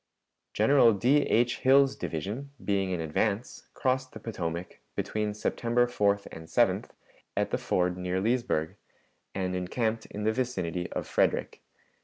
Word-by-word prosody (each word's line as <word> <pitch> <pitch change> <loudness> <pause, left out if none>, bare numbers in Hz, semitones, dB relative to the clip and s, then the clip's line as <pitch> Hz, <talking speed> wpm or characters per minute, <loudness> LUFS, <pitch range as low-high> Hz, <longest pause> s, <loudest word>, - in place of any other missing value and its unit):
General 135 -5 +5
D. 120 +8 +3
H. 120 +2 +2
Hill's 135 +1 +5
division, 105 - -4 0.2
being 100 -2 +1
in 90 -2 -1
advance, 100 +8 -2
crossed 130 0 0
the - - -8
Potomac, 85 -5 -5 0.2
between 105 -1 -2
September 120 +3 +1
4th 100 -4 +1
and 80 0 -9
7th, 80 - +2 0.5
at - - 0
the - - 0
ford 90 0 0
near 90 +1 -1
Leesburg, 110 -8 0 0.6
and 90 -1 -1
encamped 110 +5 -1
in 105 - -6
the 110 +1 +2
vicinity 95 -9 -2
of - - -3
Frederick. - - 0
105 Hz, 140 wpm, -29 LUFS, 90-120 Hz, 0.6 s, General